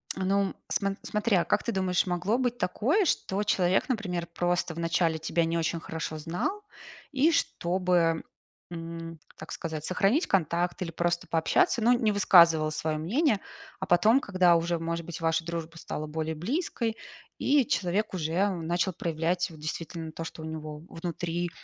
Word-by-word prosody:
Ну 195 +1 +1 0.2
сма 200 -1 0
смотри, 210 -2 +1
а, 170 - +3
как - - +1
ты 235 - -1
думаешь, 185 -3 +1
могло 180 +5 0
быть 245 -1 -1
такое, 275 - +2
что 200 - 0
человек, 185 0 +2
например, 180 -8 -2
просто 175 -1 -1
вначале 165 -1 +1
тебя 160 +2 0
не 165 +1 -1
очень 165 0 -1
хорошо 160 -1 -5
знал 175 - -3 0.5
и 290 +3 +3
чтобы, 175 - +1 0.5
м, 165 -1 -7 0.2
так - - -9
сказать, 160 -2 -4
сохранить 200 - +2
контакт 175 -1 +1
или 165 - -5
просто 170 +1 -1
пообщаться, 235 - +2
ну, 235 +3 +5
не 225 -3 +2
высказывал 170 -6 +6
свое 155 0 -1
мнение, 220 - +1 0.4
а 190 - -4
потом, 215 +8 +5
когда 185 -6 +3
уже, 170 +1 +1
может 170 +1 -3
быть, 165 -1 -7
ваша 165 0 0
дружба 165 -1 -5
стала 155 -1 -5
более 160 +1 -3
близкой, 230 - -2 0.4
и 280 -2 +3
человек 200 +2 0
уже 175 +3 +1
начал 175 +1 -1
проявлять 170 +2 -1
вот 160 -2 -13
действительно 160 +1 -5
то, 165 - -6
что 160 -1 -8
у - - -5
него 155 -1 -6
внутри,- 175 0 -3
175 Hz, 160 wpm, -28 LUFS, 165-200 Hz, 0.5 s, высказывал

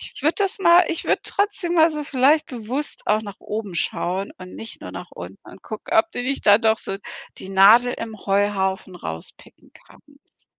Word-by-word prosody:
Ich - - -11
würde 310 - +2
das 395 -1 0
mal 345 -1 +6
ich 330 - -3
würde - - +1
trotzdem 400 -4 0
mal 325 0 +5
so 300 -1 -4
vielleicht 285 +3 +2
bewusst 250 +4 -3
auch 215 +1 +2
nach 200 -2 -10
oben 210 -4 -5
schauen 185 +3 -1
und 185 0 -10
nicht 225 - -9
nur 90 - -8
nach 90 -1 -9
unten 90 +3 -10
und - - -14
gucken, 215 +9 -6
ob 330 0 +4
du 245 - -3
nicht 275 +2 -2
da 205 0 +8
doch 225 -1 +2
so 195 - -4 0.4
die 190 - -8
Nadel 215 +6 +6
im 225 -2 -7
Heuhaufen 195 -2 0
rauspicken 80 - -9
kannst. - - -22
220 Hz, 195 wpm, -22 LUFS, 195-300 Hz, 0.4 s, da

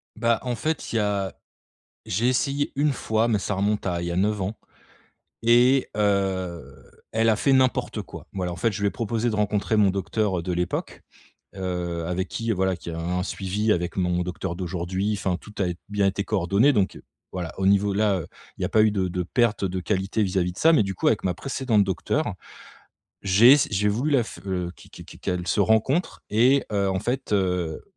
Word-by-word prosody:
Bah, 115 0 +1
en 125 -2 -2
fait, 155 +4 -3
il - - +2
y - - +3
a 100 -2 -1 0.7
j'ai 110 +7 0
essayé 140 +3 0
une 145 +1 +2
fois, 110 -2 0
mais 110 -3 +1
ça 105 - -2
remonte 105 +2 0
à 90 -2 -1
il 85 - -3
y - - -2
a - - -2
9 105 +2 +1
ans 100 +4 -3 0.9
et, 120 +3 +4
heu, 95 -4 -1 0.2
elle 115 +1 +2
a 110 - +4
fait 135 - +2
n'importe 130 -1 +2
quoi. - - -11
Voilà, 90 -2 -3
en - - -6
fait, 115 +7 +1
je 100 - -5
lui 100 - +2
ai - - -2
proposé 115 +1 -1
de - - -3
rencontrer 105 0 0
mon 105 -2 +4
docteur, 100 0 -1
heu, - - -8
de 90 +1 -3
l'époque, 90 0 -3 0.5
heu, 90 -3 -3
avec 90 +2 -2
qui 115 +4 -2
voilà 95 -2 +1
qui 85 - -9
a 80 - -5
un 90 +2 -1
suivi 100 +3 -1
avec 90 -1 -1
mon 90 -1 +1
docteur 90 0 -4
d'aujourd'hui, 95 +3 -2
enfin 95 -2 -1
tout 105 - -14
a 95 - +1
ét 90 -1 -3
bien 100 -1 +2
été 95 +1 -1
coordonné, 100 +7 +2
donc, 100 -5 +1
heu, - - -15 0.3
voilà, 90 -3 -4
au 95 - +2
niveau 100 0 +3
là, 100 -2 +2
heu, 80 - -7 0.3
il - - -9
y - - +2
a - - -2
pas 110 - +4
eu 110 - +4
de 95 -3 0
de 90 0 -2
perte 115 +2 +1
de 95 0 -2
qualité 95 +3 -1
vis-à-vis 90 -2 0
de - - -18
ça. 165 +1 +5
Mais 145 - +5
du 95 -1 -4
coup - - 0
avec 110 - +2
ma 90 - 0
précédente 125 -1 +1
docteure, 100 - -1 0.9
j'ai 105 +7 +7
ess 145 - +3
j'ai 105 +1 +2
voulu 125 +9 0
la 135 -4 +4
f - - -10
heu, 90 -2 -2
qu - - -17
qu - - -11
qu - - -13
qu'elles 90 -1 -3
se 90 - +1
rencontrent 110 - +1
et, 125 +6 +4
heu, 100 -2 +1
en 95 0 0
fait, 125 +5 -3
heu, 90 -5 0
100 Hz, 225 wpm, -24 LUFS, 90-110 Hz, 0.9 s, j'ai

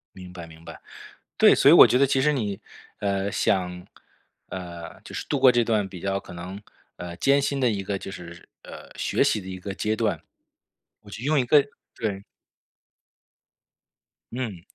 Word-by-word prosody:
明 90 -1 -11
白 85 -2 -8
明 80 0 -15
白， - - -10 0.6
对， - - +7
所 - - +5
以 - - +8
我 - - +10
觉 125 - +2
得 140 - +4
其 135 0 +1
实 150 +3 +3
你， 105 -8 -3 0.4
呃， 100 -1 -1
想， 90 -2 -1 0.6
呃， 85 -2 -8
就 - - -11
是 - - -5
度 145 - 0
过 130 -1 +8
这 120 -1 +2
段 110 -4 0
比 90 -2 -10
较 100 +1 -1
可 - - -13
能， 90 +3 -8 0.4
呃， 85 0 -8
艰 140 +10 +3
辛 140 0 -1
的 125 -2 +3
一 100 -3 -2
个 100 0 -3
就 95 - -8
是 85 -2 -11
呃， - - -12
学 - - 0
习 - - +1
的 95 - -10
一 95 0 -6
个 95 +1 -6
阶 110 +3 -1
段。 110 -2 -1 0.8
我 105 - -15
就 110 - -8
用 150 +1 +2
一 130 - +2
个 145 +3 +5 0.3
对。 100 -3 -4 2.1
嗯。 115 -8 -5
100 Hz, 200 characters per minute, -25 LUFS, 90-120 Hz, 2.1 s, 我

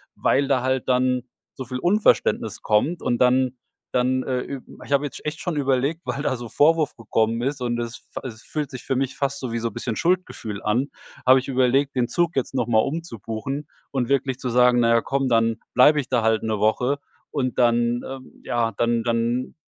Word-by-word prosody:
weil 140 +1 +2
da 135 -3 +2
halt 130 -1 0
dann 125 0 +2 0.3
so 130 - -6
viel 125 +1 -4
Unverständnis 125 - +2
kommt, 135 +11 +1
und 120 - +1
dann 130 0 +3 0.4
dann, 130 +1 +2
äh, 130 -1 -1
ü 135 -1 -6 0.2
ich - - -12
habe 140 +1 +3
jetzt 145 - -8
echt 150 +2 -3
schon 175 -4 -3
überlegt, 140 +3 0
weil 140 - -3
da 135 - 0
so 120 -2 -8
Vorwurf 155 0 +3
gekommen 115 0 0
ist 135 +1 -2
und 120 -1 -1
es 120 0 -5 0.2
f - - -5
es 115 -4 -8
fühlt 150 -3 -3
sich 125 - -8
für 135 - -1
mich 135 0 -1
fast 140 0 -1
so 130 -3 -4
wie 115 - -1
so 115 0 -2
bisschen 115 +2 -4
Schuldgefühl 170 - -1
an, 120 +7 +1 0.4
habe 130 +1 +7
ich 130 - -7
überlegt, 135 +1 +2
den 125 -2 +1
Zug 175 -1 0
jetzt 135 -1 -1
noch 125 -2 0
mal 110 -2 +4
umzubuchen 135 - -3 0.2
und 130 -4 -1
wirklich 135 -2 0
zu 125 - -3
sagen, 125 0 +4
na 115 - +3
ja, 115 0 +4
komm, 135 +1 -1
dann 115 -1 +2 0.2
bleibe 145 +4 +6
ich 130 - -4
da 125 -3 +2
halt 110 0 +2
'ne 110 -2 -1
Woche 125 +7 +1 0.3
und 130 -4 -2
dann, 120 0 +3
ähm, 135 -1 -10
ja, 115 -1 0
dann 115 -1 +1
dann 120 +2 -1
125 Hz, 210 wpm, -23 LUFS, 120-140 Hz, 0.4 s, habe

